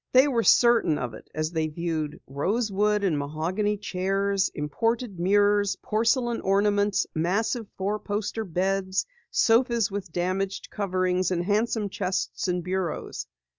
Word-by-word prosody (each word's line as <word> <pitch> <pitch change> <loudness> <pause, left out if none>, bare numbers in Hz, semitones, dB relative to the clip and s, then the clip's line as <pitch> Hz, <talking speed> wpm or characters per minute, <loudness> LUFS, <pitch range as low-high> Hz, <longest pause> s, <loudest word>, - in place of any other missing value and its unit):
They 260 +3 +7
were 245 -5 +1
certain 230 -10 +4
of 120 -3 -4
it - - -12
as 155 +1 -1
they 160 -2 0
viewed 155 -1 -3
rosewood 205 - 0
and 165 -7 +1
mahogany 175 +9 -1
chairs, 195 0 0
imported 220 - -1
mirrors, 205 +2 +3
porcelain 235 +2 +1
ornaments, 205 0 +2
massive 210 +7 0
four 205 +3 -1
poster 210 +2 -3
beds, 190 +1 0 0.2
sofas 230 -2 +3
with 195 -3 -5
damaged 185 +3 -2
coverings, 185 -2 0
and 175 -1 -1
handsome 215 +1 +1
chests 190 -1 -2
and 180 -1 -1
bureaus. 180 -2 -3
195 Hz, 130 wpm, -26 LUFS, 180-210 Hz, 0.2 s, They